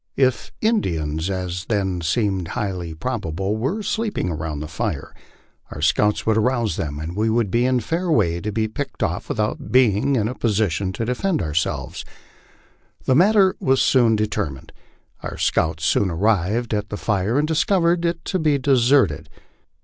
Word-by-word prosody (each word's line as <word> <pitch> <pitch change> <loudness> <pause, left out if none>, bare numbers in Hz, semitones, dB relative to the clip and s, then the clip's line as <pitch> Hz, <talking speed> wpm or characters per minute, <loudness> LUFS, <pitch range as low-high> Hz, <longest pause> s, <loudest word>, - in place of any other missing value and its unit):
If 130 -2 +1
Indians, 80 - 0
as 90 -1 -3
then 95 -5 -1
seemed 95 0 0
highly 90 -5 -3
probable, 100 -2 -2
were 135 - -2
sleeping 215 - -1
around 80 -2 -4
the 75 - -5
fire, 80 +1 -4 0.6
our - - -8
scouts 105 +6 +2
would 110 0 +2
arouse 120 -5 +1
them 75 -2 -4
and 80 +4 -5
we 110 +2 +1
would 110 -3 +1
be 120 +3 +2
in 130 -1 +2
fair 170 +9 -2
way 85 - +2
to 105 - -3
be 110 +1 0
picked 110 - -5
off - - -2
without 105 0 -2
being 130 +2 +3
in 110 -4 +1
a 125 - -3
position 100 - 0
to 115 - -3
defend 155 +9 0
ourselves. 80 -1 -2 1.0
The 130 - +3
matter 190 +5 +4
was 135 0 +2
soon 120 -4 +4
determined. 95 -10 -3 0.5
Our - - -6
scouts 80 0 0
soon 95 - +2
arrived 105 +5 0
at 105 0 -2
the 105 - -4
fire, 105 +4 0
and 150 +1 +2
discovered 170 +1 +2
it 170 -1 -2
to 185 - -1
be 155 -3 +2
deserted. 130 - +2
110 Hz, 165 wpm, -22 LUFS, 90-130 Hz, 1.0 s, matter